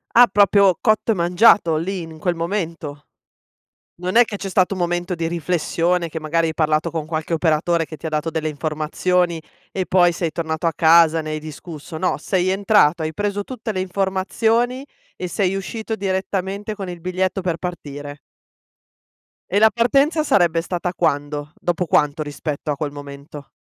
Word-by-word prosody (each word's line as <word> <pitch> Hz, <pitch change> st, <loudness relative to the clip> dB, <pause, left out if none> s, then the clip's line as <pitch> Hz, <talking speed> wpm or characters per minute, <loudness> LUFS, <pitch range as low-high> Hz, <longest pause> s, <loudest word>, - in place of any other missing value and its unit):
Ah 245 Hz, 0 st, +8 dB
proprio 200 Hz, -3 st, +4 dB
cotto 215 Hz, +1 st, +2 dB
e -, -, -5 dB
mangiato 175 Hz, -1 st, +4 dB
lì, 185 Hz, +3 st, -3 dB
in 160 Hz, -1 st, -10 dB
quel 175 Hz, +1 st, 0 dB
momento. 165 Hz, -4 st, -4 dB, 0.9 s
Non 180 Hz, +4 st, -4 dB
è 240 Hz, -, +8 dB
che 205 Hz, -3 st, -6 dB
c'è 195 Hz, -, -5 dB
stato 185 Hz, +1 st, +2 dB
un -, -, -6 dB
momento 175 Hz, +1 st, -1 dB
di 165 Hz, -1 st, -2 dB
riflessione, 170 Hz, +1 st, 0 dB
che 160 Hz, 0 st, -6 dB
magari 165 Hz, +1 st, +1 dB
hai 160 Hz, -, -2 dB
parlato 155 Hz, +1 st, +1 dB
con 160 Hz, -2 st, -4 dB
qualche 160 Hz, +1 st, -3 dB
operatore 165 Hz, +1 st, +1 dB
che 155 Hz, -, -10 dB
ti -, -, -11 dB
ha -, -, -1 dB
dato 155 Hz, +1 st, -1 dB
delle 160 Hz, -1 st, -2 dB
informazioni 160 Hz, +3 st, -1 dB, 0.3 s
e 190 Hz, -1 st, -1 dB
poi 175 Hz, -2 st, +4 dB
sei 165 Hz, -2 st, -2 dB
tornato 160 Hz, 0 st, -3 dB
a 165 Hz, -, +3 dB
casa, 165 Hz, +1 st, +5 dB
ne 155 Hz, 0 st, -5 dB
hai 155 Hz, -, -3 dB
discusso, 155 Hz, 0 st, -9 dB
no, 180 Hz, +3 st, 0 dB
sei 185 Hz, -2 st, 0 dB
entrato, 190 Hz, -4 st, +3 dB
hai 155 Hz, 0 st, -3 dB
preso 205 Hz, +2 st, -2 dB
tutte 230 Hz, -3 st, -5 dB
le 185 Hz, -, -1 dB
informazioni 220 Hz, +7 st, 0 dB, 0.3 s
e 180 Hz, -, -4 dB
sei 190 Hz, +1 st, 0 dB
uscito 220 Hz, +3 st, -4 dB
direttamente 195 Hz, +1 st, -2 dB
con 195 Hz, -3 st, -6 dB
il 175 Hz, -2 st, -7 dB
biglietto 185 Hz, +2 st, -1 dB
per 175 Hz, -2 st, -1 dB
partire. 145 Hz, -5 st, -7 dB, 1.3 s
E 200 Hz, +3 st, +2 dB
la 220 Hz, 0 st, +7 dB
partenza 275 Hz, +8 st, +2 dB
sarebbe 170 Hz, -, +3 dB
stata 175 Hz, +1 st, -3 dB
quando? 145 Hz, -3 st, -1 dB
Dopo 175 Hz, +1 st, -1 dB
quanto 150 Hz, -1 st, +1 dB
rispetto 150 Hz, 0 st, -4 dB
a -, -, -1 dB
quel 145 Hz, 0 st, -3 dB
momento? 145 Hz, 0 st, -10 dB
175 Hz, 175 wpm, -21 LUFS, 155-190 Hz, 1.3 s, Ah